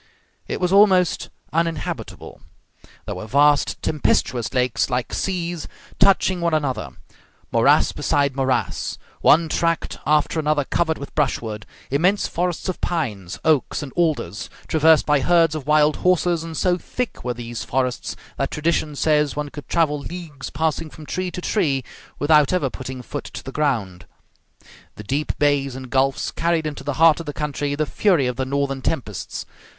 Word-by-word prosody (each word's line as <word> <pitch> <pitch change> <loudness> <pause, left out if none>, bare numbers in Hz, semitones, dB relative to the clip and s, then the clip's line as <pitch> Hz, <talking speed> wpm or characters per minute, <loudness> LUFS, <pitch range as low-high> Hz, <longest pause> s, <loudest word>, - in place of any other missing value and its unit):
It - - -3
was 180 -1 0
almost 190 -3 +4 0.2
uninhabitable. 165 0 -3 0.6
There - - -4
were 110 - -7
vast 145 +4 +3
tempestuous 130 -5 0
lakes, 125 -2 +1
like 125 -1 -2
seas, 175 -3 -2 0.3
touching 190 -2 +4
one 170 -2 +2
another; 140 -4 -1 0.6
morass - - +4
beside 140 -2 0
morass; 130 -2 -1 0.2
one 165 +2 +5
tract 165 +1 -1
after 150 +1 +2
another 150 -1 +1
covered 160 +3 0
with 140 - -9
brushwood; 110 -8 -1 0.2
immense 180 +9 +2
forests 175 +1 -2
of 185 - -3
pines, 100 - -2
oaks, 155 -1 +2
and 135 - -8
alders, 155 - -1 0.2
traversed 160 0 +4
by 150 -1 +3
herds 165 +2 +3
of 150 -3 -5
wild 150 0 +4
horses, 175 -2 +2
and 165 -2 -6
so 180 -1 +2
thick 250 +5 -4
were 125 -1 -2
these 120 -1 -6
forests 125 -1 -2 0.2
that - - -1
tradition 155 -1 -1
says 150 -1 +2
one 150 0 -3
could 145 -4 -10
travel 155 -3 +2
leagues 155 -4 -7
passing 155 +1 -1
from 155 0 -12
tree 185 +4 -2
to 180 - -6
tree 150 -11 0 0.3
without 150 -1 +4
ever 170 -8 0
putting 130 -1 -7
foot 145 - -6
to - - -8
the 135 - -7
ground. 115 -12 -1 0.9
The 105 - -9
deep 140 +8 -2
bays 140 -3 +1
and 130 -1 -8
gulfs 135 0 +1
carried 165 -1 0
into 150 -1 -5
the 145 - -2
heart 165 0 +6
of 165 - -7
the 145 - -3
country 145 -1 -2
the 155 +1 0
fury 175 -3 +2
of 125 0 -1
the 130 - -1
northern 140 0 -1
tempests. 120 - -3
150 Hz, 160 wpm, -22 LUFS, 135-165 Hz, 0.9 s, heart